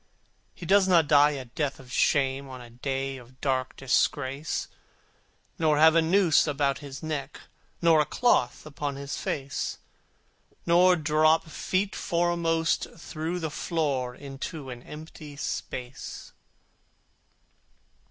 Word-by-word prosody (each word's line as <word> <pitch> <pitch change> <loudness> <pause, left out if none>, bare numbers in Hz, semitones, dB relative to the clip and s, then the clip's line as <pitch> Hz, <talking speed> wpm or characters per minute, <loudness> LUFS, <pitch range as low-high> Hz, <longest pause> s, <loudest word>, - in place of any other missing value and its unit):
He 175 - -9
does 195 +2 +4
not 170 -5 +4
die 145 0 +5
a 130 - -6
death 140 +3 -3
of 130 -2 -14
shame 135 -2 +1
On 130 -1 -8
a 120 -1 -12
day 135 +2 -3
of 130 +1 -16
dark 130 -2 -1
disgrace, 135 +2 0 0.9
Nor 155 -2 +3
have 160 +1 +7
a 165 - +5
noose 170 -1 +4
about 140 -2 0
his 140 0 -9
neck, 150 -3 -4 0.4
Nor 165 -2 +6
a - - +1
cloth 185 - +1
upon 145 -1 -4
his 140 +1 -5
face, 135 -1 -3 0.9
Nor 180 +2 +5
drop 155 0 +3
feet 185 +5 -2
foremost 170 -1 0
through 165 +1 -4
the 160 -3 -3
floor 140 -6 -1
Into 140 0 -7
an 120 -1 -8
empty 150 0 -10
space. 130 -2 -6
150 Hz, 125 wpm, -27 LUFS, 135-165 Hz, 0.9 s, have